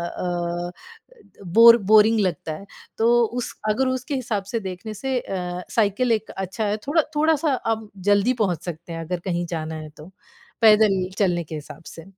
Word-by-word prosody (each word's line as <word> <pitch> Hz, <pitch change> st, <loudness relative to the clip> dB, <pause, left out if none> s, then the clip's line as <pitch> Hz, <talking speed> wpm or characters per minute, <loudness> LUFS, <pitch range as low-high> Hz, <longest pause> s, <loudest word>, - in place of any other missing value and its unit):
अ, 175 Hz, 0 st, -3 dB, 0.8 s
bore 230 Hz, +6 st, +8 dB
boring 220 Hz, +1 st, +6 dB
लगता 170 Hz, -5 st, -2 dB
है। 175 Hz, +6 st, -9 dB, 0.3 s
तो 230 Hz, +1 st, +3 dB
उस 240 Hz, +2 st, -4 dB
अगर 255 Hz, +5 st, +1 dB
उसके 260 Hz, +3 st, -3 dB
हिसाब 225 Hz, -6 st, -2 dB
से 230 Hz, -, 0 dB
देखने 190 Hz, +2 st, -7 dB
से 265 Hz, +4 st, -2 dB
अ, 180 Hz, -3 st, -5 dB
साइकिल 230 Hz, +3 st, +1 dB
एक 220 Hz, -1 st, -1 dB
अच्छा 190 Hz, +3 st, -3 dB
है, 205 Hz, 0 st, 0 dB
थोड़ा 315 Hz, +3 st, +3 dB
थोड़ा-सा 310 Hz, 0 st, +2 dB
आप 225 Hz, -3 st, -3 dB, 0.2 s
जल्दी 205 Hz, +4 st, +4 dB
पहुँच 175 Hz, -5 st, -1 dB
सकते 170 Hz, 0 st, -7 dB
हैं 165 Hz, -, -5 dB
अगर 175 Hz, +2 st, -3 dB
कहीं 175 Hz, 0 st, -1 dB
जाना 160 Hz, 0 st, -4 dB
है 155 Hz, -1 st, -7 dB
तो, 155 Hz, +4 st, -12 dB, 0.5 s
पैदल 210 Hz, -4 st, +5 dB
चलने 175 Hz, -4 st, +1 dB
के 160 Hz, -, -9 dB
हिसाब 150 Hz, 0 st, -9 dB
से। 165 Hz, -, -10 dB
200 Hz, 170 wpm, -23 LUFS, 175-230 Hz, 0.8 s, bore